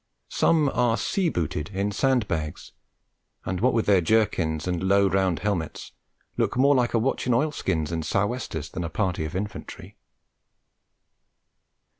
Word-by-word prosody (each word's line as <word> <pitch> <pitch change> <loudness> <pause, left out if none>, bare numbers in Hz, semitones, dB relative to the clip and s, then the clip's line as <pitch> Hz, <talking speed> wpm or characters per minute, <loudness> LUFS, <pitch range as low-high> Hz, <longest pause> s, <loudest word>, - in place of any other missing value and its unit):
Some 155 -3 +3
are 120 -3 +1
sea 190 - 0
booted 75 - -3
in 100 +1 -2
sand 125 0 +1
bags, 80 -4 -4 0.7
and 95 0 -3
what 125 +2 +4
with 115 -2 0
their 100 -3 +4
jerkins 85 -6 +1
and 90 -2 -1
low, 100 +1 +3
round 95 -2 +1
helmets, 95 -6 -3 0.5
look - - 0
more 140 +2 +5
like 125 -3 +1
a - - +5
watch 125 +2 -1
in 125 - +3
oilskins 115 - -1
and 80 -1 -2
sou' 95 +5 +1
westers 100 - -5
than 90 - -4
a 85 - -3
party 90 -2 -1
of 80 - -6
Infantry. 100 +2 -6
100 Hz, 155 wpm, -25 LUFS, 85-120 Hz, 0.7 s, more